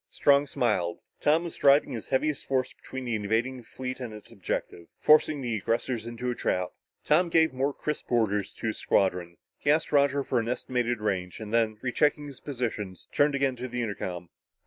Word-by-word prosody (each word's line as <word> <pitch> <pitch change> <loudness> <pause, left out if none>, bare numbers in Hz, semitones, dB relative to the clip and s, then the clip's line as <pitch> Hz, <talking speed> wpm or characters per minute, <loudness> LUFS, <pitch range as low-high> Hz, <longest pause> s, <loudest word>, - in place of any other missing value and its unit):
Strong 140 0 +4
smiled. 90 -10 0 0.2
Tom 155 +3 +3
was 170 - -6
driving 140 +1 +5
his 115 -4 -5
heaviest 145 +2 0
force 130 -1 0
between 130 -1 -8
the 120 - -2
invading 115 +5 0
fleet 130 +2 -6
and 120 -4 -6
its 105 - -13
objective 90 -5 -4
forcing 155 -1 +5
the 120 -3 -1
aggressors 115 +2 -1
into 120 +1 -3
a - - -1
trap. 90 -5 -1 0.4
Tom 170 +4 +4
gave 160 -3 +4
more 135 +2 0
crisp 150 0 -4
orders 105 -4 +1
to - - -9
his 110 - -1
squadrons. 90 -3 +1 0.2
He - - -1
asked 155 +2 +3
Roger 140 -1 +3
for 130 -2 0
an 115 0 -2
estimated 120 -2 -1
range, 95 -3 -2
and 110 0 -7
then, 110 -2 +2
rechecking 145 +4 +1
his 140 -3 -10
position, 115 -8 -3 0.2
turned 145 0 +3
again 135 -2 +1
to 125 +1 -4
the 125 0 -3
intercom. 90 -5 -4
125 Hz, 190 wpm, -28 LUFS, 110-140 Hz, 0.4 s, driving